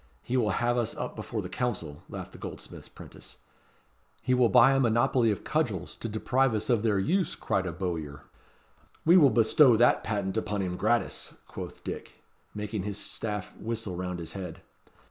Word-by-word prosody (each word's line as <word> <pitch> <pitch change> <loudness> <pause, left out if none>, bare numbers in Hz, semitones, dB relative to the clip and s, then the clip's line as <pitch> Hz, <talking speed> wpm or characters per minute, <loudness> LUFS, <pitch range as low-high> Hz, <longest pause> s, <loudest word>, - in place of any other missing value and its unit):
He 125 - -2
will 115 -4 +2
have 120 0 +1
us 120 -2 -1
up - - -4
before - - -4
the - - -4
Council," 90 - -3
laughed - - -7
the - - -13
goldsmith's - - -8
'prentice. - - -12 0.9
"He 130 - +2
will 125 -2 +4
buy 135 - +7
a 135 - +3
monopoly 120 0 +3
of 105 - -2
cudgels 110 - -1
to 115 - -5
deprive 125 +3 +1
us 110 +4 -1
of 115 -3 +3
their 105 -3 +2
use," 165 - +1
cried 95 -1 -1
a - - -2
bowyer. 80 -5 -4 0.8
"We 170 +3 +7
will 150 -7 +8
bestow 115 +2 +5
that 120 +2 +4
patent 100 -1 -2
upon 105 -2 -1
him 90 -1 -2
gratis," 115 +3 0
quoth - - -8
Dick, - - -7 0.3
making 105 0 -3
his 100 +1 -3
staff 105 -2 -4
whistle 110 -4 -3
round 90 0 -3
his 85 -2 -6
head. 90 -4 -7
110 Hz, 180 wpm, -28 LUFS, 95-120 Hz, 0.9 s, will